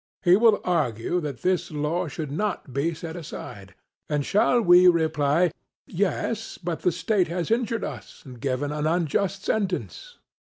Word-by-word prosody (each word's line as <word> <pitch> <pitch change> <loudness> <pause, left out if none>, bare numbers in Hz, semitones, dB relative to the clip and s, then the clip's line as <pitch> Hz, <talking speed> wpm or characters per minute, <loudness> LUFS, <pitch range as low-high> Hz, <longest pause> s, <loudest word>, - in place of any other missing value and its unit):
He 175 0 +6
will 220 0 +4
argue 160 -2 0
that 145 -5 -6
this 185 -1 +1
law 155 +4 -2
should 150 -1 -5
not 160 -5 -3
be 155 +4 0
set 165 +1 -7
aside; 100 - -9 0.3
and 145 -2 0
shall 230 - +3
we 180 -3 +6
reply, 160 -1 +3 0.3
'Yes; 205 +4 -2
but 175 -2 -4
the 180 - +1
state 185 +2 +1
has 175 +4 -3
injured 230 -1 0
us - - -8
and 125 -3 -11
given 140 +1 -1
an 150 0 -1
unjust 180 +4 0
sentence.' 220 - -3
170 Hz, 155 wpm, -25 LUFS, 150-195 Hz, 0.3 s, He